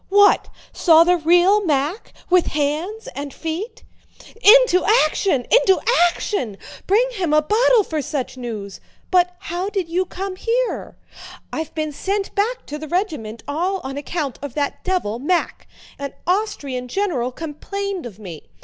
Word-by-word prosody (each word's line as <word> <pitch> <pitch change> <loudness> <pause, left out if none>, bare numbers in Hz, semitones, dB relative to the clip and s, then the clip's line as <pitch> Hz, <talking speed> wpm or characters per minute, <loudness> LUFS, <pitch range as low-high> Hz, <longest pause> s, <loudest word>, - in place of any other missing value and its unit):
"What? 405 +1 +5 0.2
Saw 330 -2 +6
the 355 +1 +3
real 355 +5 +4
Mack? 305 +4 -1 0.2
With 365 -1 +3
hands 315 +11 -2
and 285 0 -6
feet?" 330 - -5 0.6
"Into 445 -4 +7 0.2
action! 305 -4 0
Into 410 -6 +5 0.3
action! 250 - -3 0.3
Bring 440 +6 +3
him 365 -10 -1
a 305 - +5
bottle 445 +5 +4
for 315 -4 -3
such 275 -3 -4
news! 220 -6 -6 0.3
But 360 -1 +3
how 355 +3 -4
did 385 -5 -3
you 365 +2 0
come 380 0 -5
here?" 475 +4 -2 0.6
"I've 320 -1 -4
been 310 -1 -2
sent 390 +7 -3
back 455 +5 -1
to 300 +1 -6
the 310 - -7
regiment 305 - -3
all 355 +7 -1
on 265 +1 -5
account 290 -1 -4
of 285 -3 -7
that 285 -2 -2
devil, 355 - -1
Mack. 345 +6 -1 0.3
An 280 0 -5
Austrian 295 -10 -1
general 270 -7 -1
complained 350 +4 -5
of 205 -5 -12
me. 180 -7 -10
345 Hz, 150 wpm, -21 LUFS, 285-395 Hz, 0.6 s, Into